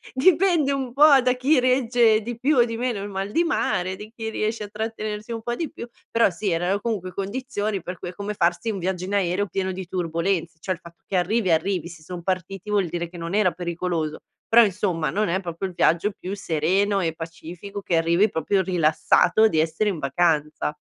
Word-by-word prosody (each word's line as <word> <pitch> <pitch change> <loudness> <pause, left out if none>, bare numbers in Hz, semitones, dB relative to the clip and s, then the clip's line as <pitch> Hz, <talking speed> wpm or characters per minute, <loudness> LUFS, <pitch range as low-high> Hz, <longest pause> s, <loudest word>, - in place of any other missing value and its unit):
Dipende 330 0 +4
un 265 -3 -3
po' 280 0 +7
da 250 0 +2
chi 265 +3 +3
regge 245 -3 +3
di 235 +1 -5
più 275 +3 +2
o 240 - +6
di 230 -1 -4
meno 235 -3 -2
il 205 - -4
mal 195 +1 -4
di 335 +6 +2
mare, 190 - 0
di 210 +3 -10
chi 225 -1 -5
riesce 215 0 -2
a 205 - -6
trattenersi 215 0 -4
un 225 - -4
po' 240 +1 -3
di 320 +1 -4
più, 235 - -8 0.2
però 230 -2 +4
sì 195 +3 -3
erano 180 +4 0
comunque 195 -6 -3
condizioni 205 -1 -3
per 180 -1 -6
cui 175 - -5
è - - -9
come 205 +2 -4
farsi 175 +4 0
un 195 - -4
viaggio 185 0 -2
in 195 - -5
aereo 195 0 +1
pieno 190 +1 -2
di 185 -1 -6
turbolenze, 170 -1 -1
cioè 185 - -2
il 165 - -21
fatto 170 0 -15
che 195 - -3
arrivi, 185 +2 +1
arrivi, 170 +1 +1
se 170 -2 -11
son 175 +1 -7
partiti 185 +2 -3
vuol 200 -4 +2
dire 170 +1 -3
che 175 - -16
non 170 +2 -5
era 205 -3 +3
pericoloso, 170 -2 -3 0.3
però 235 0 +6
insomma 180 -5 -1
non 210 -1 0
è 185 +3 +1
proprio 180 0 -4
il 180 - -9
viaggio 170 +5 +2
più 195 +1 -6
sereno 195 +4 +1
e 165 -3 -1
pacifico 170 +5 -8
che 175 - -1
arrivi 170 +6 +3
proprio 190 +3 0
rilassato 180 +4 +3
di 160 -6 0
essere 160 +6 0
in 180 -6 -3
vacanza. 150 +1 0
195 Hz, 215 wpm, -24 LUFS, 170-220 Hz, 0.3 s, po